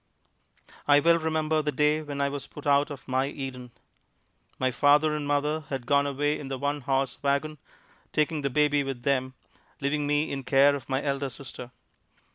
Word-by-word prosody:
I 145 0 +6
well 170 +3 +4
remember 155 -1 0
the 150 0 -1
day 150 +2 +2
when 145 -2 -5
I 140 - +1
was 140 -1 -6
put 150 - -11
out 145 +1 +3
of 145 -3 -9
my 130 +1 +1
Eden. 130 -3 -6 0.9
My 130 0 +1
father 145 +4 +4
and 150 -1 -3
mother 150 +2 0
had 135 -3 -4
gone 140 +1 +3
away 145 +2 -1
in 145 - -7
the 135 -1 -4
one 145 +2 -2
horse 135 0 -1
wagon, 140 +2 -1 0.5
taking 155 0 0
the 140 - -1
baby 145 +2 +2
with 135 -3 -5
them, 130 -1 0 0.4
leaving 145 +1 -1
me 145 +1 +1
in 135 - -3
care 140 +2 +4
of 140 -4 -6
my 135 +1 0
elder 140 -1 -1
sister. 125 -1 -9
145 Hz, 185 wpm, -27 LUFS, 135-150 Hz, 0.9 s, I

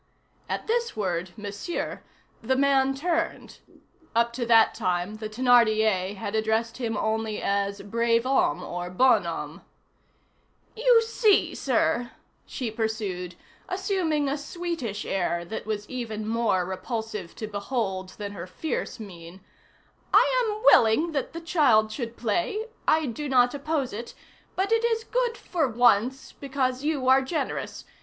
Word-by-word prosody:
At - - -3
this 470 - -1
word, 185 -3 -1
Monsieur, 205 +10 -4 0.4
the 260 - +1
man 270 0 +3
turned; 330 +3 -2 0.6
up 235 0 +2
to 240 -1 -3
that 225 -1 +6
time, 185 0 -2
the 215 0 -5
Thénardier 220 -5 +3
had 200 +1 -5
addressed 220 +1 0
him 230 -4 -2
only 220 0 -1
as 200 0 -1
brave 230 +2 +1
homme 255 - +1
or 175 0 -5
bonhomme. 255 +9 +1 1.1
"You 475 0 +5
see, 450 -2 +3
sir," 240 -1 0 0.3
she 245 -5 -4
pursued, 210 -6 -3 0.3
assuming 365 -6 0
a 280 +2 -1
sweetish 295 - -4
air 175 -2 -1
that 215 +3 -6
was 210 -1 -3
even 220 -4 -5
more 225 -5 +1
repulsive 210 -1 -5
to 220 - -5
behold 200 -3 -3
than 205 -1 -5
her 185 -3 -7
fierce 255 - -4
mien, 175 -3 -10 0.7
"I - - +5
am 430 -1 -3
willing 280 +5 +5
that 285 0 -3
the 335 - -6
child 250 -11 +3
should 235 -1 -5
play; 345 - -1 0.2
I 315 0 +4
do 280 +4 -4
not 245 -2 +4
oppose 285 -3 -2
it, 230 +3 -7 0.4
but 390 +3 0
it 455 0 +3
is 455 -1 +1
good 485 0 -1
for 325 -6 -1
once, 245 +2 +2
because 265 -2 -2
you 295 -4 -1
are 265 +1 +6
generous. 285 +4 -3
235 Hz, 140 wpm, -26 LUFS, 210-295 Hz, 1.1 s, that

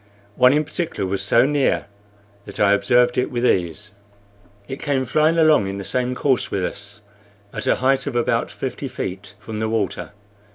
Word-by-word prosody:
One 125 0 +5
in 150 +2 +2
particular 160 - -3
was 95 +1 -2
so 120 +2 +4
near 145 -1 +1 0.6
that - - -8
I 100 -1 +4
observed 120 +4 +3
it 125 - 0
with 120 0 -2
ease. 95 +1 0 0.8
It 135 - -6
came 135 -3 -1
flying 155 +6 +2
along 155 -10 +4
in 100 0 -4
the 100 - -5
same 125 +3 -1
course 130 -1 0
with 95 -2 -1
us, 100 +1 -8 0.5
at - - -5
a - - +4
height 135 +2 +1
of 135 - -4
about 120 - 0
fifty - - -5
feet 95 +2 -6
from 105 0 -7
the 110 0 -1
water. 110 -2 -2
120 Hz, 180 wpm, -21 LUFS, 100-135 Hz, 0.8 s, One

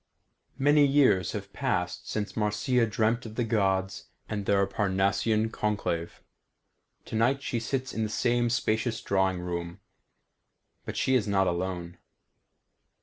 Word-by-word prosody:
Many 145 +2 +5
years 135 -10 +3
have - - -6
passed - - -2
since 105 -1 -3
Marcia 110 +3 +1
dreamt 115 +2 0
of 110 - -10
the 120 - 0
Gods 95 -4 0 0.2
and 105 - -3
of 100 - -6
their 100 -1 +3
Parnassian 100 +3 +1
conclave. 100 -7 -2 0.8
Tonight 125 +5 +1
she 120 - -1
sits 130 +3 -3
in 110 - -2
the 110 - -1
same 120 +2 +1
spacious 110 -1 0
drawing 95 -2 0
room, 85 -1 -4 1.1
but - - -5
she 130 - +1
is 120 -5 +2
not 95 -1 +2
alone. 90 -1 -3
105 Hz, 135 wpm, -28 LUFS, 95-120 Hz, 1.1 s, Many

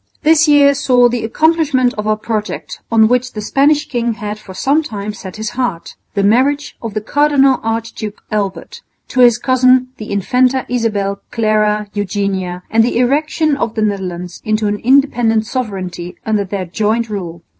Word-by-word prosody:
This 320 +1 +4
year 285 -1 +5
saw 250 -3 +3
the 240 -1 -2
accomplishment 285 0 +2
of 210 -2 -4
a 215 0 +1
project 215 0 -4
on 220 -1 +5
which 250 +1 0
the 215 - -5
Spanish 285 +6 +2
king 240 -3 -1
had 210 0 -5
for 190 -3 -12
some 280 +10 +2
time 210 -7 -5
set 190 -3 -9
his 220 0 -4
heart 240 -10 -3 0.2
the 200 - +1
marriage 265 +8 +2
of 225 -3 -6
the 215 - -1
Cardinal 275 +1 +3
Archduke 225 -2 -4
Albert 200 -3 -3 0.3
to 260 - -3
his 240 -2 +6
cousin 255 0 +3
the 215 - -8
Infanta 250 +6 +1
Isabel 210 -5 -1
Clara 215 -2 +1
Eugenia, 190 -3 -2
and 225 +1 +4
the 235 - 0
erection 295 +4 +1
of 230 -5 -3
the 220 - 0
Netherlands 180 -4 -4
into 215 0 0
an 205 0 0
independent 240 -3 +2
sovereignty 185 -8 -5
under 215 -2 0
their 190 0 -4
joint 220 +6 -1
rule. 175 -5 -6
225 Hz, 165 wpm, -16 LUFS, 205-255 Hz, 0.3 s, his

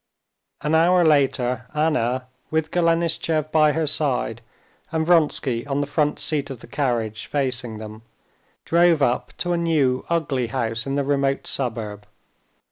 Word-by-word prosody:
An 150 - -1
hour 175 +2 +4
later 125 -5 +2
Anna, 130 -5 +1 0.2
with 160 0 -1
Golenishtchev 165 -2 +1
by 155 -1 +4
her 160 -1 0
side 135 -6 -1 0.5
and 160 -1 0
Vronsky 150 -8 +2
on 140 0 -1
the 145 - 0
front 150 +1 0
seat 145 -2 -1
of 135 -4 -7
the - - -12
carriage, 120 -6 -2
facing 125 -5 -2
them, 110 0 -9 0.6
drove 170 -3 +4
up 120 -2 0
to 175 -1 -1
a - - +1
new 150 -7 +1
ugly 145 -7 0
house 115 0 -2
in 135 - -1
the 140 - +1
remote 140 -1 0
suburb. 110 -5 -4
140 Hz, 145 wpm, -23 LUFS, 125-160 Hz, 0.6 s, hour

